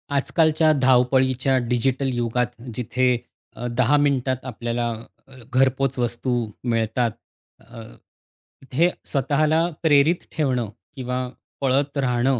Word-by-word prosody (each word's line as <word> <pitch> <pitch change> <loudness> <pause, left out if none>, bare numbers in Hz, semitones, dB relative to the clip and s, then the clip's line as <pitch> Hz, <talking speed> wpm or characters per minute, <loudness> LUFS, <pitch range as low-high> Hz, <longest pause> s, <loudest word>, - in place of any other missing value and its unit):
आजकालच्या 155 +2 +3
धावपळीच्या 130 +1 +3
डिजिटल 130 +2 +1
युगात 120 0 -1
जिथे 125 +1 +1 0.4
अ, 120 - -6
10 125 +3 +2
मिनिटात 130 -3 0
आपल्याला 120 -1 -2 0.4
अ, 135 - -17 0.2
घरपोच 135 +1 +2
वस्तू 120 +1 -1 0.3
मिळतात. 115 0 0 0.5
अ, 115 0 -12 0.9
हे 170 +7 +4 0.2
स्वतःला 155 +3 +1 0.2
प्रेरित 155 +2 +4
ठेवणं 130 -7 0 0.3
किंवा 125 -1 -3 0.4
पळत 140 +2 +1
राहणं 125 -1 +1
130 Hz, 100 wpm, -23 LUFS, 120-140 Hz, 0.9 s, हे